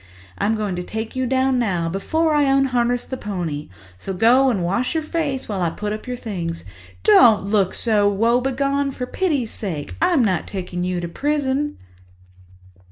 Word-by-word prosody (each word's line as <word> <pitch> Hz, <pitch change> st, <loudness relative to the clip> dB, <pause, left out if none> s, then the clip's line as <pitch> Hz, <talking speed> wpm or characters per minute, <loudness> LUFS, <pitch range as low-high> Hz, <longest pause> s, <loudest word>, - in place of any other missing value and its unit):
I'm 215 Hz, +2 st, +1 dB
going 210 Hz, -4 st, -2 dB
to -, -, -2 dB
take 220 Hz, +5 st, -5 dB
you 260 Hz, -1 st, 0 dB
down 260 Hz, 0 st, +2 dB
now, 180 Hz, -8 st, 0 dB
before 310 Hz, -, 0 dB
I 295 Hz, -1 st, +3 dB
unharness 250 Hz, -3 st, +2 dB
the 260 Hz, -, -5 dB
pony, 175 Hz, -9 st, -4 dB, 0.3 s
so 195 Hz, -, -5 dB
go 250 Hz, +7 st, +5 dB
and 200 Hz, -8 st, 0 dB
wash 200 Hz, -, -1 dB
your 320 Hz, -, 0 dB
face 300 Hz, -4 st, -2 dB
while 200 Hz, -3 st, -3 dB
I 170 Hz, -, +2 dB
put 210 Hz, +5 st, -4 dB
up 215 Hz, +4 st, -7 dB
your 250 Hz, 0 st, -3 dB
things. 175 Hz, -8 st, -5 dB, 0.4 s
Don't 225 Hz, -, +6 dB
look 200 Hz, -2 st, +1 dB
so 210 Hz, -3 st, +2 dB
woebegone, 265 Hz, +6 st, +1 dB
for 250 Hz, -, -4 dB
pity's 285 Hz, -7 st, -1 dB
sake! 165 Hz, -9 st, -5 dB
I'm 340 Hz, -8 st, +3 dB
not 185 Hz, -5 st, 0 dB
taking 180 Hz, -2 st, -4 dB
you 180 Hz, -1 st, -1 dB
to 170 Hz, -, -3 dB
prison." 290 Hz, -, -1 dB
230 Hz, 170 wpm, -21 LUFS, 190-270 Hz, 0.4 s, Don't